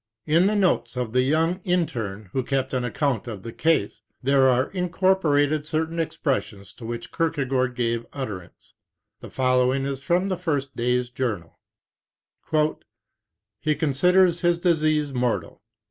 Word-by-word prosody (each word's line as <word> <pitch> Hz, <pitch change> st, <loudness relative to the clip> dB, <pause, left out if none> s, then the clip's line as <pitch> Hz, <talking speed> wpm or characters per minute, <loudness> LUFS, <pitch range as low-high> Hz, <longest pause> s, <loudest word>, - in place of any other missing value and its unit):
In 165 Hz, +5 st, +4 dB
the 215 Hz, -, +1 dB
notes 150 Hz, -, +1 dB
of 120 Hz, -3 st, -3 dB
the 125 Hz, -, +4 dB
young 165 Hz, +7 st, +1 dB
interne 110 Hz, -, -2 dB
who 130 Hz, -, +1 dB
kept 135 Hz, +1 st, -2 dB
an 130 Hz, -1 st, 0 dB
account 125 Hz, -1 st, -1 dB
of 105 Hz, -5 st, -7 dB
the 115 Hz, -, -7 dB
case, 160 Hz, -11 st, 0 dB, 0.2 s
there 135 Hz, 0 st, +4 dB
are 130 Hz, +2 st, +1 dB
incorporated 170 Hz, -5 st, +1 dB
certain 160 Hz, +2 st, -2 dB
expressions 105 Hz, -11 st, -2 dB
to 115 Hz, -, -11 dB
which 115 Hz, 0 st, -6 dB
Kierkegaard 135 Hz, -6 st, 0 dB
gave 115 Hz, -1 st, -1 dB
utterance. 105 Hz, -5 st, -8 dB, 0.5 s
The -, -, -10 dB
follow 125 Hz, -1 st, +2 dB
ing 135 Hz, +1 st, -1 dB
is 135 Hz, -1 st, -3 dB
from 180 Hz, +6 st, +1 dB
the 185 Hz, -, -1 dB
first 145 Hz, -6 st, -2 dB
day's 125 Hz, +1 st, 0 dB
journal: 110 Hz, -10 st, -4 dB, 2.0 s
"He 155 Hz, +3 st, 0 dB
considers 170 Hz, +5 st, +3 dB
his 175 Hz, -1 st, +3 dB
disease 155 Hz, -4 st, +1 dB
mortal. 120 Hz, -9 st, -2 dB
135 Hz, 145 wpm, -24 LUFS, 120-165 Hz, 2.0 s, In